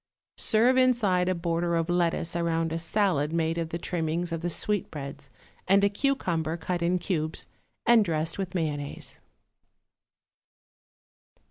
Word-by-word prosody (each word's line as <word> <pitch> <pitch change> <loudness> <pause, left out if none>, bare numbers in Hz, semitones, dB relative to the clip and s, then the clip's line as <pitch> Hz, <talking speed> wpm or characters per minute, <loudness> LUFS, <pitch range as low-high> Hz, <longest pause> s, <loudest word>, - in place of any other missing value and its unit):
Serve 240 +4 +4
inside 215 -8 +3
a 185 - +1
border 170 0 -1
of 165 -1 0
lettuce 170 -1 0
around 165 -1 0
a 165 - -2
salad 165 -5 +1
made 165 0 0
of 165 -1 -3
the 170 - -3
trimmings 170 0 -2
of 165 -1 -3
the 175 - -1
sweetbreads 145 -7 -3 0.4
and 195 +1 +4
a 200 - +5
cucumber 180 - -1
cut 175 +1 -3
in 175 +2 +2
cubes 160 -4 -2 0.4
and 235 -2 +6
dressed 160 -1 -1
with 190 -1 -4
mayonnaise. 145 -4 -3
170 Hz, 135 wpm, -27 LUFS, 160-190 Hz, 0.4 s, and